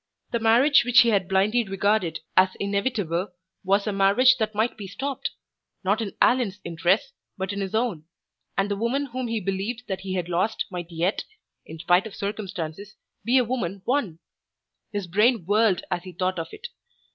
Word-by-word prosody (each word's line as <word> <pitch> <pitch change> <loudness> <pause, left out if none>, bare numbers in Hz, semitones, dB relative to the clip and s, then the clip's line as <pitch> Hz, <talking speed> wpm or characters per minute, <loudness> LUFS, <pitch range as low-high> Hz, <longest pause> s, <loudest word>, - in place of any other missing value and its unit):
The 235 - 0
marriage 240 +6 +5
which 245 0 +6
he 235 - +3
had 195 -4 +1
blindly 205 +5 +2
regarded 195 -3 0
as 185 0 +4
inevitable 200 -3 -1 0.3
was 200 +1 +2
a 210 - -1
marriage 200 +7 +5
that 215 -1 -1
might 220 +3 +1
be 205 -3 -8
stopped 275 +7 -4 0.5
not 200 +4 +1
in 205 -3 -4
Allan's 230 -6 +2
interests, 180 - 0 0.2
but 190 +1 -3
in 200 - -3
his 195 +2 -3
own 220 -10 -1 0.5
and 195 - +2
the - - +1
woman 235 +7 -1
whom 255 0 -3
he 230 -1 -1
believed 200 +5 -3
that 190 -2 -3
he 190 -1 -4
had 180 -2 -2
lost 180 +5 0
might 175 -2 -5
yet, 175 +4 -1 0.4
in 160 - -8
spite 175 +5 +2
of 210 - -11
circumstances, 200 -1 -5 0.3
be 245 +3 +3
a 255 - +5
woman 200 -6 -3
won! 240 - 0 0.7
His 205 -3 -3
brain 210 +3 +2
whirled 205 -1 +2
as 175 -1 0
he 185 0 -10
thought 185 0 -1
of 165 - -4
it. 480 +2 -8
200 Hz, 180 wpm, -25 LUFS, 185-230 Hz, 0.7 s, which